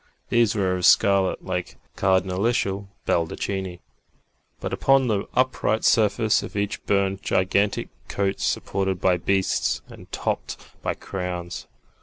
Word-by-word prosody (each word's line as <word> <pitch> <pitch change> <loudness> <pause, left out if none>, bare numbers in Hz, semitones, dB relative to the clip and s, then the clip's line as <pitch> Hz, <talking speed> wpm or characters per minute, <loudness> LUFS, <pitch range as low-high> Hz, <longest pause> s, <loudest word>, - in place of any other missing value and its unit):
These 115 -2 +3
were 95 -3 +1
of 90 - -1
scarlet, 100 -2 +4
like 90 -1 -3 0.2
cardinalitial 95 +2 +1 0.2
baldachini, 90 +2 -2 0.8
but - - -4
upon 135 -1 +4
the 105 -4 0
upright 130 -3 +1
surface 110 -1 +3
of - - -8
each 100 0 -2
burned 100 -1 +1
gigantic 100 +1 +1 0.2
coats 100 -1 -1
supported 95 -1 -1
by 90 -1 +3
beasts 95 +2 0
and - - -13
topped - - -2 0.2
by - - -1
crowns. 90 -2 -5
95 Hz, 120 wpm, -24 LUFS, 95-105 Hz, 0.8 s, scarlet